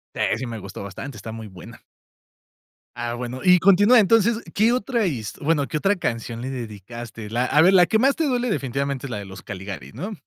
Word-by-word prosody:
Eh. - - +1
Sí 130 - -4
me 115 -2 -6
gustó 100 0 -8
bastante, 110 +6 -8
está 110 +2 -8
muy 110 -1 -8
buena. 95 -4 -12 1.1
Ah, 120 0 -3
bueno. 125 +1 -5
Y 180 -1 +6
continúa, 205 +6 +6
entonces, 225 +2 +4 0.2
¿qué 220 +3 +3
otra 235 -2 0
his 120 -11 -3
bueno, 150 -2 +1
qué - - -2
otra 195 +6 +2
canción 115 -5 -3
le 130 - -4
dedicaste? 115 -2 -7
La 120 +3 0
a 150 +4 +4
ver, 185 +3 +6
la 180 -2 +7
que 220 +5 +1
más 270 +4 +3
te 325 - 0
duele 250 -3 0
definitivamente 140 - -2
es 125 - -8
la - - -3
de 100 - -6
Los 95 -1 -10
Caligaris, 95 -9 -7
¿no? 210 +4 -5
130 Hz, 215 wpm, -23 LUFS, -, 1.1 s, la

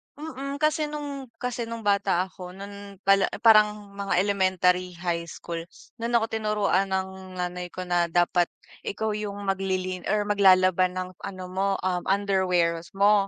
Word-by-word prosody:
mm, 275 -2 -5
kasi 305 0 +2
no'ng 285 -3 -5
kasi 240 -1 -3
no'ng 230 -1 -6
bata 200 -3 +2
ako, 180 0 -10
no'n 200 0 -9
bala 195 0 +5 0.2
parang 210 -2 +5
mga 195 -2 0
elementary, 185 -2 +2
high 170 -1 -2
school, 170 0 -6 0.4
no'n 235 +1 -1
ako 225 -1 +2
tinuruan 210 -3 +1
ng 190 -1 -4
nanay 180 0 -3
ko 185 +1 -6
na 175 -1 +1
dapat 175 +1 +2 0.4
ikaw 220 +2 -1
'yung 210 -1 -3
maglilin 185 -2 -2
or 210 -1 +2
maglalaba 185 -3 +5
ng 185 0 -5
ano 185 -2 -7
mo, 195 +2 0 0.2
um, 185 -1 +1
underwears 185 -4 +1
mo. 200 0 +4
195 Hz, 150 wpm, -26 LUFS, 185-210 Hz, 0.4 s, bala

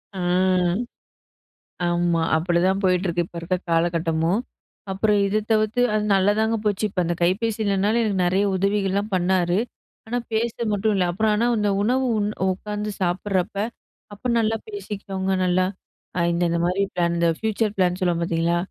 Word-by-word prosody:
ஆ, - - -4 1.7
ஆமா 175 -1 +1
அப்பிடிதான் 175 +3 +1
போயிட்ருக்கு. 180 -2 +1
இப்ப 170 - -14
இருக்க 180 +2 -1
காலகட்டமும். 165 +2 +1 0.5
அப்புறம் 205 +2 +2
இத 210 +2 +1
தவிர்த்து. 215 +2 +1
அது 210 0 +1
நல்லாதாங்க 210 +4 +2
போச்சு. 210 0 0
இப்ப 185 - -2
அந்த 175 +1 -1
கைபேசி 210 +5 +1
இல்லனாலும் 200 +3 +1
எனக்கு 200 -4 0
நிறைய 190 +3 +2
உதவிகள்லாம் 200 +1 0
பண்ணாரு, 180 0 +2 0.5
ஆனா 245 +2 -1
பேச 225 +1 0 0.2
மட்டும் 210 +1 +1
இல்ல 190 -2 +2
அப்புறம் 215 +3 +1
ஆனா 225 +3 +1
அந்த 210 -1 +1
உணவு 255 +4 +1
உண் 205 0 0 0.2
உட்காந்து 210 +2 -4
சாப்பிட்றப்போ, 190 +2 -1 0.5
அப்ப 240 +5 -4
நல்லா 225 0 +1
பேசிக்கிட்டோங்க, 195 - -4
நல்லா 180 0 +2 0.5
அ - - +1
இந்த, 170 +1 +1
இந்தமாரி 175 +3 0
பிளான் 170 -1 +1
இந்த 170 0 +2
ஃபியூச்சர் 220 -1 -1
பிளான் 180 -1 +1
சொல்லுவோம் 175 -2 +1
பார்த்தீங்களா! 170 0 +1
195 Hz, 145 wpm, -23 LUFS, 175-210 Hz, 1.7 s, அப்புறம்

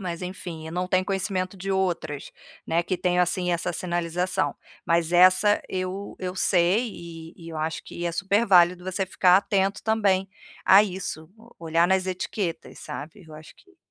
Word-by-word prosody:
Mas 175 -3 -5
enfim, 180 -3 -7
eu 160 - -7
não 180 +1 -2
tenho 185 0 +2
conhecimento 190 -1 -2
de 195 +1 -5
outras, 175 -6 -2 0.3
né, 165 +1 +1
que 185 +2 -2
tenham, 180 0 +2
assim, 180 0 0
essa 175 +1 -1
sinalização, 175 +1 -1 0.3
mas 170 0 +1
essa 185 +4 +5
eu 185 +2 -4
eu 185 -1 -4
sei, 185 +5 +2
e 165 -1 -10
e 165 -2 -11
eu 160 - -7
acho 155 +1 -3
que 175 - -7
é 170 - 0
super 200 +5 +1
válido 180 -1 +5
você 185 +1 -2
ficar 180 0 +4
atento 195 0 0
também 200 -4 +1 0.4
a 195 +2 +8
isso, 180 -5 -5
o 230 +2 -19
olhar 165 +1 +3
nas 190 0 +2
etiquetas, 185 -1 -4
sabe, 155 +6 -8
eu 155 - -14
acho 155 +1 -12
que 385 -2 -24
180 Hz, 175 wpm, -25 LUFS, 170-190 Hz, 0.4 s, a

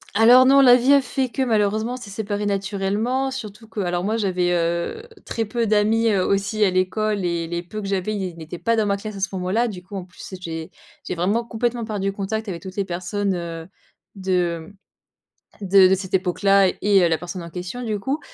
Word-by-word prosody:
Alors 245 +4 +7
non, 275 +1 +6
la 245 -2 +8
vie 255 +3 +4
a 280 - +6
fait 260 +1 -2
que, 265 +3 -1
malheureusement, 220 0 +1
on 255 - -4
s'est 235 -5 -10
séparé 205 0 -3
naturellement. 205 +6 -1
Surtout 225 -4 -8
que, 220 - -7
alors 175 -1 -1
moi, 215 +3 0
j'avais, 180 -4 0
heu, 170 - -1 0.2
très 225 - -2
peu 230 +2 -1
d'amis, 215 +2 +3
heu, 195 -4 +2
aussi 200 +2 +1
à 190 - +2
l'école, 200 +2 0
et 170 -1 -1
les 170 0 -3
peu 195 +5 -7
que 200 - -5
j'avais 195 +2 -1
ils 185 -4 -4
n'étaient 165 +1 -8
pas 230 +6 +1
dans 220 -2 +1
ma 200 0 +1
classe 215 +1 -7
à - - -6
ce 195 - 0
moment-là. 190 +6 0
Du 185 -5 -7
coup, 200 +2 -10
en 190 -2 -5
plus, 180 +1 -12
j'ai 165 0 -6 0.4
j'ai - - -2
vraiment 200 +7 0
complètement 235 0 -2
perdu 200 -3 -2
contact 210 +3 -4
avec 170 -3 -5
toutes 190 -1 -8
les 200 -2 -1
personnes, 185 +2 -2
heu, 165 -1 -6 0.5
de 180 -4 -1
mmh, - - -17 0.9
de 190 0 +7
de 190 - +4
cette 190 0 -6
époque-là, 195 +1 +3
et, 200 -2 +4
heu, - - +4
la 165 - +2
personne 175 +2 -6
en 170 - -8
question, 180 +9 -6
du 215 -3 -2
coup. 270 +9 -2
200 Hz, 220 wpm, -22 LUFS, 180-220 Hz, 0.9 s, la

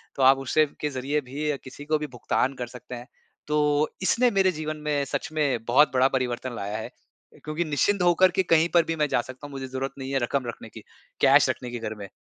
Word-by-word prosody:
तो 135 - 0
आप 135 +1 +7
उस 135 -1 -5 0.3
के 150 - 0
ज़रिए 140 +2 -2
भी 150 +2 -2
किसी 140 +2 -10
को 155 +1 +1
भी 150 - -4
भुगतान 125 +1 -1
कर 125 -1 -5
सकते 125 0 -9
हैं। 120 +1 -9 0.4
तो 150 - 0 0.5
इसने 235 +6 +3
मेरे 195 -1 +3
जीवन 155 0 -4
में 145 -1 +1
सच 140 +1 -3
में 140 -7 0
बहुत 130 +5 +4
बड़ा 130 0 +4
परिवर्तन 125 0 -3
लाया 100 0 -4
है 110 - -6 0.5
क्योंकि 155 +3 -2
निश्चिंत 180 +6 +1
होकर 180 +1 +5
के - - +5
कहीं 165 +1 +4
पर 170 -1 +6
भी - - -1
मैं 150 -2 +1
जा - - +3
सकता 130 +4 -10
हूँ - - -13
मुझे 135 -1 -6
ज़रूरत 130 +1 -4
नहीं 135 0 -5
है 135 - +1
रकम 130 +2 -1
रखने 115 -1 -7
की, - - -11 0.4
कैश - - +6
रखने 125 - -3
की 120 - -5
घर 110 -1 -4
में। 100 -2 -8
135 Hz, 235 wpm, -25 LUFS, 125-155 Hz, 0.5 s, आप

